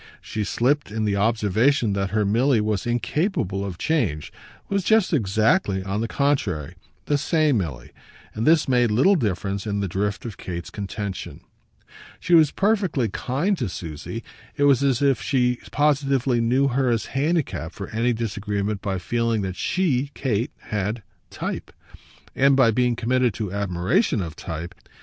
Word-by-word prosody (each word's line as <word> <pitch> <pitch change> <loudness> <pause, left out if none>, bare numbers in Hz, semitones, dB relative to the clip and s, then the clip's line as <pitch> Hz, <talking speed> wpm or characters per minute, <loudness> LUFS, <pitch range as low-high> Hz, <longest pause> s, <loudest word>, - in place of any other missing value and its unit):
She 110 - -4
slipped 135 +8 +1
in 110 +1 -2
the 100 -1 +1
observation 110 +3 +2
that 100 0 -1
her 105 0 +1
Milly 120 +5 +3
was 105 0 -1
incapable 120 - -1
of 95 -3 -5
change, 105 - -1 0.3
was 200 -1 0
just 220 -2 +3
exactly, 110 - +2
on 100 +3 -2
the 115 - -1
contrary, 115 - 0 0.3
the 145 -1 +1
same 155 -5 +2
Milly; 70 -10 -5 0.4
but 110 +2 -2
this 160 -1 +4
made 125 -2 +3
little 130 - +4
difference 100 - -1
in 100 -1 -1
the 100 - -1
drift 100 +5 -2
of 110 -4 -6
Kate's 85 -1 -6
contention. 100 -1 -5 0.8
She 175 - -1
was 160 -3 +7
perfectly 190 - +1
kind 140 - -1
to 120 -7 -1
Susie: 85 +7 -6 0.3
it 145 - +1
was 140 -3 +5
as 135 -1 +2
if 135 -4 +2
she 125 -3 +1
positively 135 -4 +2
knew 130 +4 +2
her 130 0 +1
as 115 -3 0
handicapped 135 - -1
for 100 - -6
any 115 +2 +1
disagreement 105 -2 -2
by 100 -3 -2
feeling 115 +3 -1
that 95 -1 -3
she, 145 - 0
Kate, 120 -3 -1 0.2
had 105 +2 -2 0.3
"type," - - -5 0.6
and 140 +1 +4
by 130 -4 +5
being 125 +1 +1
committed 120 -1 +1
to 105 -4 -4
admiration 100 - +1
of 85 -4 -4
type. 85 +2 -6
115 Hz, 160 wpm, -23 LUFS, 100-140 Hz, 0.8 s, was